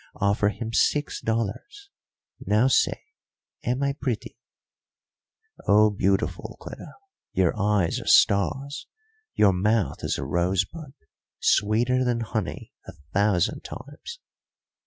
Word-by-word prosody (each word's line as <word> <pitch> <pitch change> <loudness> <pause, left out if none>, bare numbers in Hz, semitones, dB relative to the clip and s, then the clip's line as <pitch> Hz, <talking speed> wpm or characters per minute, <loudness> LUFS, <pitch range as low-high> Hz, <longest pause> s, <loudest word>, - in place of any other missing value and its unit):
Offer 100 +1 +2
him 115 +2 -6
six 145 +5 +1
dollars. 115 - -3 0.5
Now 105 +4 +3
say, 135 - +2 0.6
am 125 +3 -1
I 140 0 +1
pretty?" 130 -6 -4 1.3
"Oh, 105 +1 +5
beautiful, 95 -1 -1
Cleta; - - -10 0.4
your 95 -4 +2
eyes 100 -4 +1
are - - -10
stars, 135 +8 +2 0.5
your 100 -2 +5
mouth 105 +3 0
is - - -1
a - - -4
rosebud, 95 - -1 0.4
sweeter 120 +5 +2
than 120 -2 0
honey 110 -3 -4
a - - -8 0.2
thousand 100 -3 +1
times." 145 - -9
110 Hz, 110 wpm, -25 LUFS, 100-130 Hz, 1.3 s, Oh